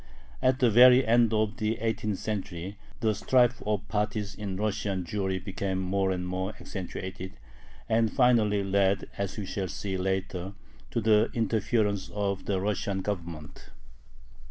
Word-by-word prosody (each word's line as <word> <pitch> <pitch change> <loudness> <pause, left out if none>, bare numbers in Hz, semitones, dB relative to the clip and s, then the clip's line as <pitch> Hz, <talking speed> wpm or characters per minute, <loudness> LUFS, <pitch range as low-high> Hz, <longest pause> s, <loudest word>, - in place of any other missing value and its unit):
At 130 0 +3
the 125 -4 +3
very 125 +3 +8
end 115 0 +4
of 110 +1 0
the 110 -1 -1
eighteenth 110 -3 -1
century 95 -3 -4 0.3
the 110 -1 +2
strife 125 +3 +2
of 105 -1 -1
parties 105 0 -2
in 100 -2 -5
Russian 100 -2 -1
Jewry 95 0 -1
became 95 0 -3
more 95 +1 0
and 90 -1 -2
more 95 +3 -3
accentuated, 95 0 -6 0.5
and 110 -1 +2
finally 115 -6 +3
led, 100 0 +2
as 100 +1 -3
we 105 - -4
shall 95 0 -3
see 95 +1 -4
later, 95 0 -2 0.4
to - - -1
the 110 -1 +4
interference 105 -2 0
of 100 -2 -1
the 95 -2 0
Russian 100 -1 -1
Government. 85 -7 -6
100 Hz, 145 wpm, -28 LUFS, 95-110 Hz, 0.5 s, very